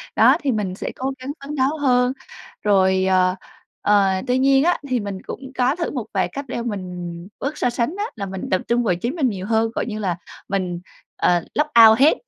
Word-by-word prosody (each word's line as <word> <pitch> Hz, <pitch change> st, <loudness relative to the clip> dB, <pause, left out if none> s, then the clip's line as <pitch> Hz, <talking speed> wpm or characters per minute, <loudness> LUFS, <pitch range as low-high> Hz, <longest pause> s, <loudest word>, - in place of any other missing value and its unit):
đó, 255 Hz, +6 st, +6 dB
thì 280 Hz, -, +1 dB
mình 205 Hz, -5 st, -2 dB
sẽ -, -, -5 dB
cố 265 Hz, +1 st, -2 dB
gắng 260 Hz, +2 st, -5 dB
phấn 295 Hz, +2 st, -5 dB
đấu 280 Hz, +3 st, +1 dB
hơn. 250 Hz, -2 st, +2 dB, 0.5 s
Rồi, 190 Hz, -2 st, +3 dB
ờ, 185 Hz, -1 st, +3 dB, 0.5 s
ờ, 205 Hz, -1 st, +4 dB, 0.2 s
tuy 250 Hz, -, +2 dB
nhiên 270 Hz, +1 st, +4 dB
á, 350 Hz, +1 st, +3 dB
thì 255 Hz, -2 st, 0 dB
mình 200 Hz, -3 st, -5 dB
cũng 265 Hz, -1 st, -8 dB
có 255 Hz, +3 st, +2 dB
thử 340 Hz, -1 st, -3 dB
một 250 Hz, -6 st, -4 dB
vài 190 Hz, -, +1 dB
cách 280 Hz, 0 st, -5 dB
đeo 235 Hz, -1 st, -4 dB
mình 180 Hz, -5 st, -5 dB, 0.3 s
bớt 285 Hz, +3 st, -3 dB
so -, -, +1 dB
sánh 240 Hz, +8 st, -1 dB
á, 410 Hz, -, -1 dB
là 200 Hz, -3 st, -4 dB
mình 190 Hz, -1 st, -6 dB
tập 185 Hz, -, +2 dB
trung 240 Hz, +1 st, +2 dB
vào 195 Hz, -6 st, +1 dB
chính 235 Hz, -, -3 dB
mình 280 Hz, -7 st, +1 dB
nhiều 190 Hz, -3 st, -5 dB
hơn, 225 Hz, +1 st, +1 dB
gọi -, -, -1 dB
như 215 Hz, -2 st, -5 dB
là 185 Hz, -5 st, -1 dB, 0.3 s
mình, 185 Hz, -3 st, -2 dB, 0.4 s
ờ, 175 Hz, -1 st, +2 dB
log 300 Hz, 0 st, +2 dB, 0.2 s
out 220 Hz, +2 st, +4 dB
hết, 300 Hz, -, +5 dB
230 Hz, 225 wpm, -21 LUFS, 190-270 Hz, 0.5 s, đó